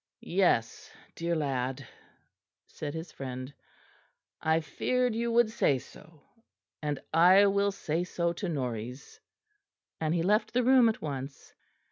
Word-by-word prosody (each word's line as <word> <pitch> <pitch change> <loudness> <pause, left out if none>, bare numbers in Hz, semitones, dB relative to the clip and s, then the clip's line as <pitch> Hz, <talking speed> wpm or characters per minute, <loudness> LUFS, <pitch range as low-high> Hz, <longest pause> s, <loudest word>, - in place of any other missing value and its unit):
"Yes, 170 -11 +1 0.2
dear 170 0 -2
lad," 135 -3 -2 0.8
said 150 0 -7
his 160 +1 -6
friend, 130 0 -7 0.9
"I 160 0 +2
feared 250 - -1
you 235 +1 -1
would 230 -1 +3
say 145 - +2
so; 155 +4 -15 0.6
and 150 -2 -2
I 180 +5 +7
will 200 0 +2
say 165 -3 -2
so 170 -1 -1
to 180 +2 -4
Norreys"; 125 -3 -5 0.8
and 160 +1 0
he 165 - +1
left 210 +5 +1
the 250 +1 +2
room 250 -2 +6
at 220 - -4
once. 140 -2 -6
165 Hz, 130 wpm, -29 LUFS, 140-200 Hz, 0.9 s, I